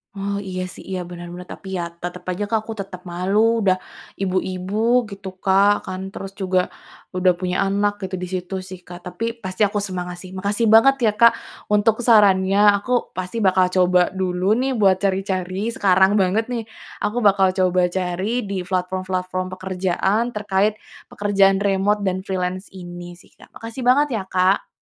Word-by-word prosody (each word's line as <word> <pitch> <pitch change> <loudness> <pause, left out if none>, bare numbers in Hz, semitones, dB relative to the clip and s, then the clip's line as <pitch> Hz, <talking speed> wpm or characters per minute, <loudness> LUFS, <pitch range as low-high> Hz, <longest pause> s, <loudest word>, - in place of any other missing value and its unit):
Oh, 200 0 -3
iya, 185 0 -3
sih, 185 - -12
iya, 185 - -2
bener 175 0 -8
banget 180 +1 -9
tapi - - -14
ya - - -1 0.2
tetep 175 0 -5
aja 185 +3 -3
Kak 225 - +3
aku 225 - -5
tetep 195 -3 -7
malu 205 +6 +1
udah 185 -2 +3 0.4
ibu-ibu 195 +5 0
gitu 200 -2 -8
Kak 200 +2 +3
kan, 185 0 -5
terus 195 0 -7
juga 185 -2 0 0.5
udah 185 0 +4
punya 185 +1 0
anak 200 +1 +1
gitu 190 0 -3
di 180 - -4
situ 185 +1 -4
sih 185 0 -9
Kak. 175 0 -9
Tapi 180 +6 -4 0.2
pasti 185 +3 -1
aku 205 0 +1
semangat 180 -3 -5
sih, 185 +1 -10
makasih 205 +4 0
banget 225 +5 +6
ya 215 - +4
Kak 235 +2 +7 0.4
untuk 210 +3 +2
sarannya 200 -4 +4 0.2
aku 205 +5 -5 0.2
pasti 185 +5 -4
bakal 185 -3 +3
coba 180 -1 +3
dulu, 185 0 -1
nih, 265 0 0
buat 195 -4 +3
cari-cari 190 +1 -1
sekarang 190 -1 +3
banget, 195 +4 +2
nih, 235 -2 -2 0.4
aku 215 +3 -1
bakal 195 -2 +5
coba 185 -1 +2
cari 190 +6 -2
di 195 -3 -4
platform-platform 185 0 -2
pekerjaan 190 +5 -1
terkait 210 0 +1 0.3
pekerjaan 200 -1 +2
remote 200 +1 +1
dan 185 -1 0
freelance 185 0 -3
ini 175 -1 -9
sih 180 - -21
Kak. - - -20
Makasih 230 +2 -8
banget 285 +2 +4
ya 190 - -5
Kak. 185 +1 +2
190 Hz, 170 wpm, -21 LUFS, 185-205 Hz, 0.5 s, Kak